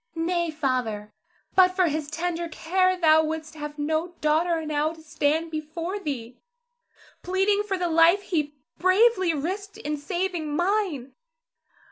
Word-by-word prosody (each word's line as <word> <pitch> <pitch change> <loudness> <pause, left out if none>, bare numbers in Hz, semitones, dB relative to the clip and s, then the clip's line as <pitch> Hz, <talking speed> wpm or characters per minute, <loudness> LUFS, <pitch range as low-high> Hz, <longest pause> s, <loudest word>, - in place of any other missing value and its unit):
Zara. 325 0 -2
Nay, 345 -1 0
Father; 250 -9 -2 0.4
but 365 -1 +5
for 370 -1 +3
his 305 -2 -2
tender 340 +1 -3
care 370 +3 +1
thou 315 -2 +5
wouldst 315 0 -4
have 295 -1 -7
no 315 +4 -1
daughter 320 +2 +1
now 305 +1 0
to 325 - -15
stand 315 +2 0
before 330 +5 -4
thee, 250 - -5 0.8
pleading 385 +3 +1
for 405 -2 -2
the 360 -1 -1
life 335 +4 +4
he 300 -6 -2 0.2
bravely 375 -2 +4
risked 390 +7 -4
in 300 +1 -3
saving 340 0 -3
mine. 350 - -1
325 Hz, 140 wpm, -25 LUFS, 300-365 Hz, 0.8 s, but